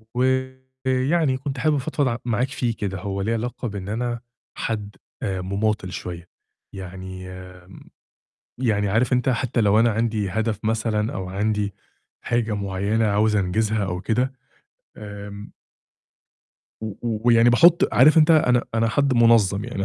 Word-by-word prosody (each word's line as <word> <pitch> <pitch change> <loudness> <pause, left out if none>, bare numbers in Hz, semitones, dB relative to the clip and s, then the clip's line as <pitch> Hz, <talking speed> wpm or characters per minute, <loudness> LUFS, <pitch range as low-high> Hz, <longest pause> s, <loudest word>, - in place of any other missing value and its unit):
ويعني 130 +3 0
كنت 135 0 -5
حابب 155 +1 +2
أفضفض 145 0 -1
ع 115 -2 -1
معاك 120 +2 0
فيه 120 -4 -2
كده، 95 -3 -4
هو 100 +1 -4
ليه 110 +4 0
علاقة 120 +2 -3
بإن 100 -2 -6
أنا 120 +2 -2 0.4
حد 105 -2 -4 0.3
آآ، 95 -1 -2
مماطّل 100 0 -1
شوية، 85 -1 -7 0.4
يعني 95 -1 -8
آمم، 90 0 -12 0.7
يعني 105 -5 0
عارف 115 +6 +2
أنت 125 +1 +2
حتى 120 -1 0
لو 105 +1 +4
أنا 115 0 +4
عندي 110 -2 -1
هدف 110 +2 -1
مثلًا 110 0 0
أو 95 -2 -5
عندي 105 +1 -1 0.5
حاجة 115 -2 -1
معيّنة 100 +3 -1
عاوز 105 +1 +2
أنجزها 105 +2 0
أو 90 -1 -4
كده، 125 +5 0 0.6
آمم 105 0 -9 1.3
و - - -3 0.2
و 115 -2 -1
ويعني 115 0 +6
باحط 170 +9 +5
عارف 155 +6 +6
أنت 155 +1 +5
أنا 125 -6 +4
أنا 115 0 +2
حد 140 +3 +1
منظَّم، 115 -4 +4
يعني 100 -5 -3
110 Hz, 145 wpm, -23 LUFS, 100-125 Hz, 1.3 s, ويعني